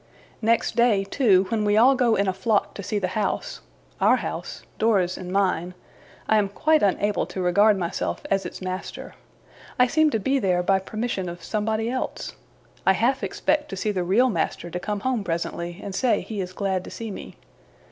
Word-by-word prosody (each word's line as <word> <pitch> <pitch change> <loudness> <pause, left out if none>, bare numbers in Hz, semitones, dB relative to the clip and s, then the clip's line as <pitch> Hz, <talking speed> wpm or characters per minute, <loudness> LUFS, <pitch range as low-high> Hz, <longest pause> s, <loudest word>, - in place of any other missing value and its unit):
Next 230 +1 +1
day, 235 -5 +3
too, 195 -3 +3
when 225 -2 0
we 205 0 +2
all 250 +5 +7
go 245 -4 +2
in 200 0 +1
a 190 - +1
flock 205 +2 0
to - - -7
see 210 +2 -2
the 185 -3 -1
house 205 0 -2 0.4
our - - +5
house - - -5 0.2
Dora's 195 -5 +2
and 180 -1 -7
mine 185 -2 0 0.5
I 220 - +4
am 200 -2 0
quite 310 +9 +2
unable 205 +1 +1
to - - -6
regard 200 +4 +4
myself 175 -2 -3
as 195 0 +2
its 180 +1 -7
master. 185 0 -6 0.6
I 250 - +6
seem 310 +5 +3
to 225 - 0
be 270 +6 +1
there, 180 -5 +1
by 190 +1 +3
permission 205 -2 -3
of 175 0 -9
somebody 220 +3 -1
else. 255 +2 -3 0.5
I 190 - +5
half 245 +7 +1
expect 300 -1 0
the 195 -3 -1
real 230 +8 +3
master 175 -4 -2
to 180 - -3
come 205 +2 -3
home 250 -2 0
presently, 170 0 -3
and 200 - -5
say 250 +5 +2
he 210 -3 -5
is 180 -1 -5
glad 190 -1 -2
to - - -8
see 225 -2 -6
me. - - -9
205 Hz, 190 wpm, -24 LUFS, 185-230 Hz, 0.6 s, all